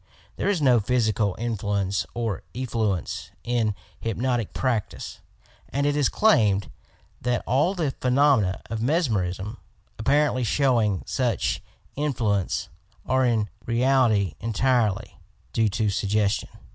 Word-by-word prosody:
There - - -1
is 180 -7 +1
no 125 -3 +5
physical 110 -3 +1
influence 100 -5 -1
or 115 -7 -2
effluence 110 - -2
in 115 -4 0 0.2
hypnotic 115 0 -1
practice, 120 -5 -2 0.5
and 140 +1 -1
it 145 0 +2
is 145 -3 +3
claimed 105 - +3 0.5
that 120 -1 0
all 150 +10 +2
the 160 -6 0
phenomena 125 -7 +3
of 115 -1 -4
mesmerism, 110 - 0 0.4
apparently 140 +2 +2
showing 115 -6 +2
such 125 -3 0 0.3
in 145 -1 -1
fluence, 100 -6 0 0.4
are 130 0 +2
in 115 -4 +2 0.2
reality 115 - +3
entirely 115 -3 0 0.3
due 110 -2 +2
to 105 +1 0
suggestion. 100 +1 0
115 Hz, 115 wpm, -25 LUFS, 105-130 Hz, 0.5 s, no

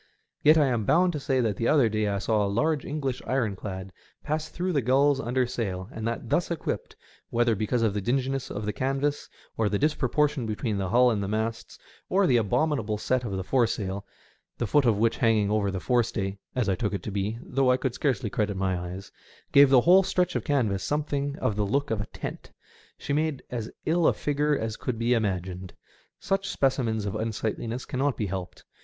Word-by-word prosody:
Yet 155 +2 +6
I 150 - +5
am 120 -5 0
bound 175 - +3
to 150 - -3
say 135 -2 +1
that 110 -4 0
the 115 - 0
other 140 -6 +4
day 110 -1 0
I 100 -1 0
saw 105 +1 +1
a 100 - 0
large 150 +8 0
English 135 -4 -3
ironclad 100 -6 -2 0.3
pass 155 +1 -2
through 180 +1 -2
the 140 - +2
GuUs 135 +3 +3
under 125 +2 +1
sail, 95 -6 -4
and 110 -2 -4
that 115 +1 -3
thus 175 - +1
equipped 170 -2 -4 0.2
— - - -25
whether 120 0 +2
because 110 +3 0
of 110 -3 +2
the 105 - -2
dinginess 135 +4 -1
of 105 +1 -4
the 105 - -2
canvas, 135 +2 -1 0.3
or 110 -2 +2
the 100 - 0
disproportion 150 -2 +1
between 105 -1 -2
the 95 -2 -2
hull 125 +3 +5
and 105 -3 -1
the 100 - -2
masts, 110 +2 -3 0.3
or 195 +1 +3
the 125 -8 +4
abominable 115 -1 0
set 125 +4 0
of 110 -5 -4
the 95 -1 -2
foresail, 100 -4 0 0.5
the 120 - -1
foot 140 +6 +3
of 115 -4 +3
which 115 +2 +2
hanging 110 -4 +2
over 105 -2 +1
the 95 -1 -3
forestay 100 -3 0 0.2
(as 125 -5 0
I 95 - +2
took 100 +2 -1
it - - -5
to 105 - -4
be, 100 +3 -2
though 135 0 +1
I 125 - +4
could 130 -2 -2
scarcely 130 -6 -1
credit 105 -2 -1
my 95 -1 0
eyes) 90 +3 -6 0.4
gave 140 -1 +7
the 130 -2 +6
whole 180 +6 +6
stretch 180 -2 0
of - - -1
canvas 110 - 0
something 145 -1 -1
of 105 - -1
the 105 - 0
look 140 +7 0
of 110 -2 0
a 105 - -6
tent, - - -7 0.5
she - - -3
made 155 -2 0
as 115 -3 -4 0.2
ill 165 +1 +3
a - - +4
figure 145 0 0
as 110 -2 -3
could 125 -3 -3
be 115 +2 +2
imagined. 95 -4 -2 0.4
Such 195 0 -1
speci 135 -1 +2
mens 110 -2 -1
of 100 - -2
unsightliness 110 +2 -3
cannot 135 +1 -1
be 105 - -1
helped. 95 -2 -6
115 Hz, 215 wpm, -27 LUFS, 105-140 Hz, 0.5 s, gave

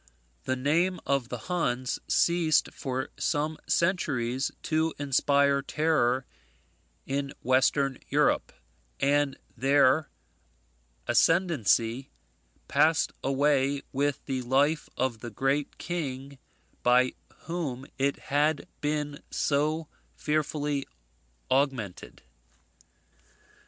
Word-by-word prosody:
The 130 - 0
name 165 +7 +1
of 135 -4 0
the 125 - -4
Huns 130 -8 -1
ceased 170 -3 +3
for 130 -1 -3
some 155 +2 -1
centuries 135 -8 0
to 160 0 0
inspire 140 0 +2
terror 135 -4 +1 0.8
in 140 +1 -2
Western 130 +1 +2
Europe, - - +2 0.5
and 145 0 +2 0.2
their 140 +3 +3 1.0
ascendency 135 - +2 0.6
passed 160 +1 +3
away 140 0 +2
with 140 +1 -1
the 130 -1 -2
life 140 +5 +1
of 125 -3 -1
the 120 - -6
great 135 +6 -1
king 140 -5 -5 0.4
by 125 +1 +4 0.3
whom 150 -7 -4
it 140 +1 +1 0.2
had 150 +1 +2
been 150 -1 -2
so 155 +2 0 0.3
fearfully 150 -2 -1 0.6
augmented. 130 - -1
140 Hz, 90 wpm, -28 LUFS, 130-155 Hz, 1.0 s, by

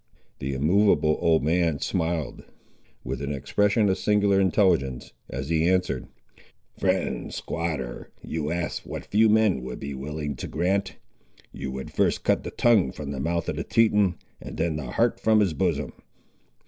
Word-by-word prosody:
The 70 +1 -3
immovable 80 +1 +3
old 80 -4 +3
man 85 -1 +2
smiled, 80 0 -2 0.6
with - - -4
an 70 0 -3
expression 100 - +1
of 95 - +1
singular 100 -2 +3
intelligence, 85 - +1 0.2
as 65 +3 -5
he 80 +1 +2
answered— 90 -8 0 0.7
"Friend - - -1
squatter, 75 -7 -4
you 75 -2 -3
ask 85 0 -3
what - - -7
few 110 +2 +3
men 105 -9 +3
would 60 0 -6
be 70 0 -5
willing 75 +2 -4
to - - -5
grant. 95 +4 -1 0.6
You 65 - -6
would 65 0 -6
first - - +1
cut - - +2
the - - -6
tongue 110 - +3
from 70 0 -6
the 70 - -4
mouth 85 +3 -1
of - - -2
the - - -2
Teton, 105 -5 +3 0.3
and - - -8
then 80 -1 0
the 75 -5 -5
heart - - +1
from 110 -1 +4
his 95 -6 +2
bosom." 70 - -1
85 Hz, 160 wpm, -25 LUFS, 70-100 Hz, 0.7 s, from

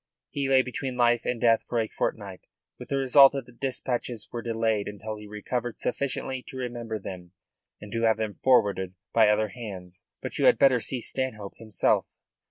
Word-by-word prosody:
He 140 -2 -2
lay 130 -1 +5
between 130 0 -4
life 120 -1 +3
and 125 - -1
death 115 -1 +4
for 120 - 0
a 110 - 0
fortnight, 100 -5 -4 0.3
with - - -10
the 140 - 0
result 135 +1 +7
that 135 -3 -4
the 125 - -16
dispatches 125 -3 -3
were 120 - -4
delayed 110 -3 0
until 105 +1 -6
he 105 0 -10
recovered 115 +3 -4
sufficiently 130 0 -2
to 130 - -8
remember 120 -3 -4
them 90 -3 -9 0.5
and 105 - -11
to 115 - -2
have 110 -1 +3
them 110 -2 -2
forwarded 100 -8 +2 0.2
by 110 -2 +6
other 105 0 +2
hands. 95 -6 -9 0.2
But - - -5
you - - +3
had - - +6
better 130 -3 +5
see 125 +2 -3
Stanhope 110 -6 -3
himself." 110 -2 0
115 Hz, 185 wpm, -27 LUFS, 105-125 Hz, 0.5 s, result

